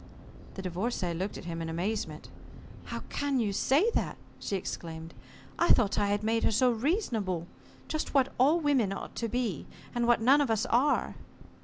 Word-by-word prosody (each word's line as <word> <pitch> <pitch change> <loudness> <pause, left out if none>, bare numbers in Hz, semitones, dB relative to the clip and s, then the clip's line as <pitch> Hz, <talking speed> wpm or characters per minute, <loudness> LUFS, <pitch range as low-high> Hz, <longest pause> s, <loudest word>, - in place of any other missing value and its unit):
The 190 - -6
Divorcée 185 -1 -2
looked 190 +4 -3
at - - -9
him 165 -1 -4
in 165 - -3
amazement. 170 -2 -3 0.6
"How - - -5
can 285 -2 0
you 210 -4 0
say 300 - +3
that?" - - -1 0.2
she 200 - -3
exclaimed. 165 -3 -5 0.5
"I 340 - +3
thought 210 -4 +4
I 205 - +2
had 205 +1 0
made 225 +1 +1
her - - +4
so 245 +3 +3
reasonable. 225 - -1 0.4
Just 310 - -2
what 270 -1 +3
all 295 +7 +5
women 275 - +2
ought - - -7
to 230 - -1
be, 235 - -2 0.3
and 240 -1 0
what 240 -2 +5
none 265 +6 +5
of 280 - +1
us 220 -1 +1
are." 270 +5 +2
225 Hz, 180 wpm, -30 LUFS, 185-260 Hz, 0.6 s, all